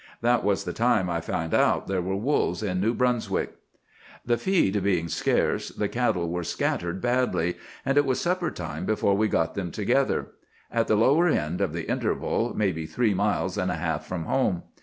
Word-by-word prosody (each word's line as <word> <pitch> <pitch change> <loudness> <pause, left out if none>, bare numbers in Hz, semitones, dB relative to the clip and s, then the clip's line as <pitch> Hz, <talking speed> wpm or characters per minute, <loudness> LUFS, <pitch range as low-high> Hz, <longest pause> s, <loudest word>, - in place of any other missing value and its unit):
That 120 +1 +2
was 100 0 +1
the 90 - -4
time 110 -6 +2
I 85 -1 -1
found 80 0 -3
out - - +3
there 95 -2 -1
were 95 +2 -2
wolves 115 +1 0
in 90 -3 -1
New 115 +4 +1
Brunswick. 125 -2 0 0.7
"The 120 - +2
feed 115 - +1
being 90 -4 +1
scarce, - - 0
the - - -2
cattle 85 -1 0
were 90 0 -2
scattered 85 +2 -2
badly; 120 -8 +1 0.3
and 135 +1 +3
it 145 - +3
was 130 - +1
supper 175 -1 0
time 80 -3 -6
before 105 -2 +2
we 110 +2 +2
got 80 -5 0
them 95 -4 -3
together, - - 0 0.4
at 115 -1 +1
the 110 - +3
lower 145 +10 +4
end 85 - 0
of 95 -5 +1
the 85 0 -5
interval, - - -1
maybe 90 -7 0
three 110 +6 +1
miles 100 +2 0
and - - 0
a - - -1
half - - -3
from 85 -3 -4
home. 95 -9 0
100 Hz, 190 wpm, -26 LUFS, 85-120 Hz, 0.7 s, lower